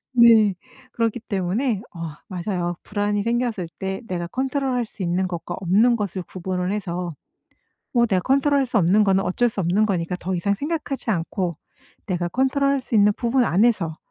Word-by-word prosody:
네. 225 -5 +6 0.4
그렇기 230 0 -1
때문에 205 +2 -1
어 - - -8 0.3
맞아요. 175 -2 -2
불안이 205 0 -1
생겼을 235 -7 -1
때 190 0 -3
내가 175 -2 -2
컨트롤 265 +2 -1
할 240 -2 0
수 205 - -9
있는 180 +2 0
것과 175 0 -5
없는 215 +7 +4
것을 200 -3 -3
구분을 185 +1 -3
해서 180 -4 -3 0.8
뭐 240 -2 +4
내가 190 -4 +1
컨트롤 280 +2 +3
할 270 - +2
수 245 - -2
없는 195 +4 +4
거는 195 -1 +2
어쩔 235 +7 +1
수 210 - -4
없는 190 +5 +2
거니까 180 -2 -1
더 185 +2 -2
이상 200 +4 +1
생각하지 290 -4 -3
않고 170 -1 -2 0.5
내가 175 -2 -1
컨트롤 270 +5 +1
할 275 - 0
수 245 - -6
있는 210 -1 +5
부분 245 +1 +1
안에서 190 -6 +2
205 Hz, 345 characters per minute, -23 LUFS, 180-240 Hz, 0.8 s, 네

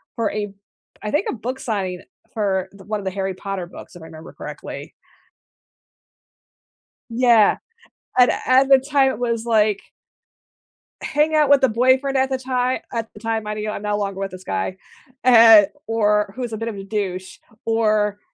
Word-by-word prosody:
for 230 -2 -1
a 205 -1 -4 0.5
I 210 - -3
think 300 +7 0
a - - -2
book 255 +2 -5
signing 190 -5 -3 0.3
for 190 -4 -1
the 195 - -14
1 215 0 -3
of 195 - -9
the 190 - -1
Harry 195 0 -3
Potter 195 -2 -5
books, 175 - -13
if 175 - -12
I - - -10
remember 160 0 -12
correctly. - - -8 2.2
Yeah, 230 -3 +4 0.6
and 250 - +6 0.2
at 265 +1 +4
the 270 - +7
time, 270 0 +2
it 215 - -8
was 235 -2 -2
like 215 -3 +2 1.2
hang 310 +1 +1
out 300 -2 +3
with 285 -1 +6
the 265 - +4
boyfriend 260 +4 +2
at 265 0 +2
the 265 - -1
ti 260 0 -13 0.4
at 225 -1 -4
the - - -13
time, 225 -1 -2
minding 210 0 -4
you, - - -2
I'm 210 - -5
no 210 0 -1
longer 200 -2 -3
with 195 0 -3
this 185 0 -11
guy, 95 - -3 0.5
and 225 -4 +8 0.2
or 210 -2 +1
who's 245 -3 -4
a - - -3
bit 225 +1 -3
of 220 - -6
a 195 - -7
douche, 190 -3 -4 0.3
or 215 -2 +1
215 Hz, 180 wpm, -21 LUFS, 200-250 Hz, 2.2 s, and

